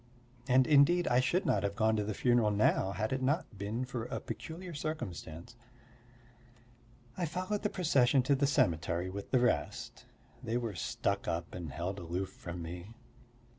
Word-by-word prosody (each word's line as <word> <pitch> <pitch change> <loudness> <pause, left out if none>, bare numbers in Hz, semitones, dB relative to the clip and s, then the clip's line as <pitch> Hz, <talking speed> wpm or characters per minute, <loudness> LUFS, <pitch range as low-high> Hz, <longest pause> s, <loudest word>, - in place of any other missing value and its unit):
And 130 0 +5
indeed 155 +5 +5
I 120 - +4
should 170 +10 +1
not - - +2
have 100 -1 -2
gone 110 +1 +2
to 105 - 0
the 105 0 -3
funeral 120 -3 +3
now 100 -2 +2
had 110 +4 -1
it 130 - -1
not 135 - 0
been 110 +5 -2
for 125 -3 -4
a - - -4
peculiar 175 +2 -7
circumstance. 95 - -5 1.6
I 175 - -1
followed 185 +6 -2
the 210 - 0
procession 135 -8 +3
to 140 - +3
the 140 +1 +2
cemetery 85 - +1
with 100 +1 -6
the 130 - +3
rest; 120 -12 -1 0.4
they 115 +2 -1
were 115 -3 -3
stuck 90 - -2
up 85 0 -3
and 85 -5 -6
held 90 +7 -4
aloof 90 +2 -3
from 85 -1 -7
me. 90 +6 -8
115 Hz, 170 wpm, -32 LUFS, 95-140 Hz, 1.6 s, And